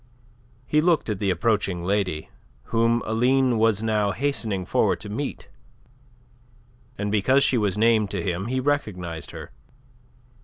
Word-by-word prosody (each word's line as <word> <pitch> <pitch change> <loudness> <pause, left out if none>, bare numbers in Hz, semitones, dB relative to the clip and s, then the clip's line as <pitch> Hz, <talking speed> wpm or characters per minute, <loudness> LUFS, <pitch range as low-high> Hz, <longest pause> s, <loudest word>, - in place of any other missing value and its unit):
He 150 +4 +2
looked 165 -8 +2
at 100 - -3
the 100 - 0
approaching 100 -2 0
lady, 90 -5 -1 0.4
whom 115 +1 +2
Aline 125 +1 +2
was 110 -1 +2
now 105 -3 +1
hastening 110 -9 -2
forward - - +1
to 105 - -7
meet, 135 +7 -5 1.5
and 105 0 -2
because 130 +7 +3
she - - +2
was 105 -4 0
named 110 -2 +3
to 95 -4 -3
him 90 +3 -2
he 130 +2 -1
recognized 95 - -2
her. - - -9
110 Hz, 140 wpm, -24 LUFS, 100-120 Hz, 1.5 s, because